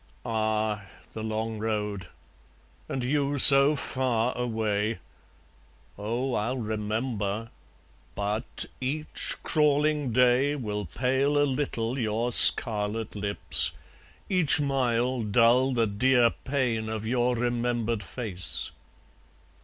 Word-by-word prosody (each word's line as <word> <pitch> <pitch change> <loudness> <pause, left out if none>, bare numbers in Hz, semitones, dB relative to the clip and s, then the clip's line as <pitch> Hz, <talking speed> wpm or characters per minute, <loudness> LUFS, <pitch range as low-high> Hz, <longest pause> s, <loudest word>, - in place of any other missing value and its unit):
Ah! 110 -2 -2 0.3
the 110 - -7
long 110 0 -4
road! 105 -4 -4 0.8
and 130 - -4
you 140 +2 -1
so 140 +2 +8
far 125 -3 -2
away! 110 -2 -2 1.0
Oh, 120 +6 -4
I'll 120 +5 -2
remember! 110 -1 -4 0.6
but... 105 +2 -5 0.2
each 150 +4 -1
crawling 150 -2 +1
day 125 +4 +2
Will 105 -6 -5
pale 130 - -1
a 145 - +3
little 130 -3 -3
your 115 +1 -2
scarlet 110 -1 +5
lips, 100 0 +1 0.5
each 180 -8 +2
mile 130 -3 -1
Dull 115 +5 +2
the 120 -3 0
dear 120 +3 +2
pain 125 -5 -3
of 110 -1 -5
your 125 +1 0
remembered 120 -2 -2
face. 95 -2 +1
115 Hz, 100 wpm, -26 LUFS, 110-130 Hz, 1.0 s, so